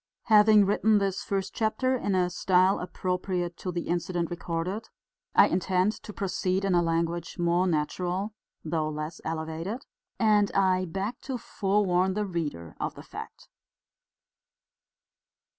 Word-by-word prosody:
Having 210 Hz, -1 st, +7 dB
written 210 Hz, +2 st, +3 dB
this 195 Hz, -2 st, 0 dB
first 195 Hz, -1 st, -2 dB
chapter 225 Hz, +4 st, +1 dB
in 205 Hz, -6 st, -1 dB
a 180 Hz, -1 st, +2 dB
style 185 Hz, +2 st, +3 dB
appropriate 180 Hz, -1 st, -2 dB
to 185 Hz, -, -4 dB
the 175 Hz, -1 st, -4 dB
incident 175 Hz, 0 st, -1 dB
recorded, 175 Hz, +5 st, -3 dB, 0.5 s
I -, -, +8 dB
intend 185 Hz, +2 st, +1 dB
to -, -, -8 dB
proceed 190 Hz, -1 st, -1 dB
in 195 Hz, -, +2 dB
a 175 Hz, -, +4 dB
language 170 Hz, 0 st, -1 dB
more 175 Hz, +1 st, +2 dB
natural 180 Hz, +5 st, -1 dB, 0.3 s
though 155 Hz, -1 st, -1 dB
less 155 Hz, +1 st, -5 dB
elevated, 165 Hz, -, -4 dB, 0.3 s
and 210 Hz, -3 st, +3 dB
I 185 Hz, -1 st, +3 dB
beg 195 Hz, +7 st, -4 dB
to 265 Hz, -2 st, -4 dB
forewarn 190 Hz, -5 st, +1 dB
the 210 Hz, 0 st, 0 dB
reader 150 Hz, -, -4 dB
of -, -, -3 dB
the -, -, -10 dB
fact. -, -, -10 dB
185 Hz, 135 wpm, -28 LUFS, 170-200 Hz, 0.5 s, I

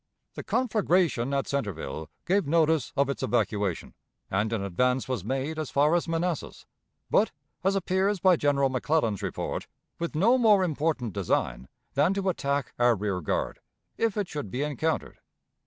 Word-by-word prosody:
The -, -, -6 dB
conflagration 180 Hz, -, +1 dB
at 140 Hz, -1 st, 0 dB
Centreville 80 Hz, -, -3 dB, 0.2 s
gave 190 Hz, -2 st, +2 dB
notice 160 Hz, -2 st, +2 dB
of 140 Hz, 0 st, +3 dB
its 140 Hz, -, -3 dB
evacuation, 105 Hz, -7 st, -1 dB, 0.4 s
and 105 Hz, +3 st, 0 dB
an 110 Hz, -4 st, -1 dB
advance 125 Hz, +7 st, +1 dB
was 125 Hz, -8 st, -2 dB
made 135 Hz, +7 st, -2 dB
as 155 Hz, -, -3 dB
far 145 Hz, +3 st, +3 dB
as 175 Hz, 0 st, +1 dB
Manassas, 165 Hz, 0 st, -2 dB, 0.5 s
but, -, -, +4 dB, 0.3 s
as 195 Hz, +1 st, +2 dB
appears 190 Hz, +1 st, +1 dB
by 185 Hz, 0 st, +5 dB
General 140 Hz, -3 st, +2 dB
McClellan's 130 Hz, -, 0 dB
report, 95 Hz, -4 st, -3 dB, 0.3 s
with 170 Hz, -2 st, -3 dB
no 230 Hz, +11 st, +4 dB
more 210 Hz, -5 st, +5 dB
important 150 Hz, -, -1 dB
design 90 Hz, -9 st, -1 dB, 0.3 s
than 150 Hz, +8 st, +3 dB
to 195 Hz, -1 st, 0 dB
attack 140 Hz, -5 st, -1 dB
our 120 Hz, -1 st, +5 dB
rear 100 Hz, -3 st, -2 dB
guard, 75 Hz, -, -2 dB, 0.4 s
if 225 Hz, -2 st, 0 dB
it 205 Hz, -3 st, 0 dB
should 145 Hz, -, -5 dB
be 130 Hz, +8 st, -2 dB
encountered. 150 Hz, +2 st, -2 dB
140 Hz, 155 wpm, -27 LUFS, 115-175 Hz, 0.5 s, by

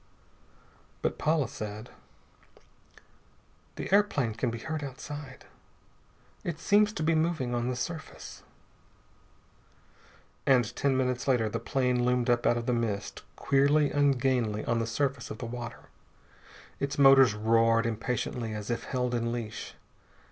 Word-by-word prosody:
But -, -, -1 dB
Paula 155 Hz, -4 st, +2 dB
said: 110 Hz, +2 st, -7 dB, 1.8 s
"The -, -, -4 dB
airplane 145 Hz, -, +3 dB
can 115 Hz, +3 st, -1 dB
be 115 Hz, -, -4 dB
heard 155 Hz, +6 st, -4 dB
outside. 135 Hz, 0 st, -8 dB, 1.0 s
It 165 Hz, -2 st, -4 dB
seems 210 Hz, +3 st, +4 dB
to 155 Hz, -, -3 dB
be 165 Hz, +1 st, +3 dB
moving 155 Hz, -6 st, 0 dB
on 120 Hz, 0 st, -1 dB
the 125 Hz, -, -2 dB
surface." 155 Hz, +5 st, -6 dB, 2.1 s
And 120 Hz, -4 st, +3 dB
ten 135 Hz, -2 st, +1 dB
minutes 125 Hz, 0 st, -1 dB
later 120 Hz, -5 st, +2 dB
the -, -, -3 dB
plane 125 Hz, -3 st, 0 dB
loomed 125 Hz, 0 st, +2 dB
up 120 Hz, 0 st, +2 dB
out 120 Hz, -, +3 dB
of 120 Hz, -, -3 dB
the 125 Hz, -, +1 dB
mist, 110 Hz, -4 st, -2 dB
queerly 140 Hz, +1 st, +3 dB
ungainly 130 Hz, -6 st, +1 dB
on 115 Hz, 0 st, +1 dB
the 115 Hz, -, -1 dB
surface 135 Hz, +2 st, -2 dB
of 110 Hz, -, -6 dB
the 120 Hz, -, -6 dB
water. 120 Hz, 0 st, -7 dB, 0.9 s
Its 140 Hz, 0 st, -2 dB
motors 135 Hz, -5 st, +7 dB
roared 115 Hz, +1 st, +3 dB
impatiently 115 Hz, 0 st, -2 dB
as 105 Hz, +2 st, -4 dB
if 120 Hz, -, -3 dB
held 125 Hz, -2 st, -1 dB
in 115 Hz, -1 st, -1 dB
leash. 115 Hz, -3 st, -5 dB
125 Hz, 135 wpm, -29 LUFS, 115-140 Hz, 2.1 s, motors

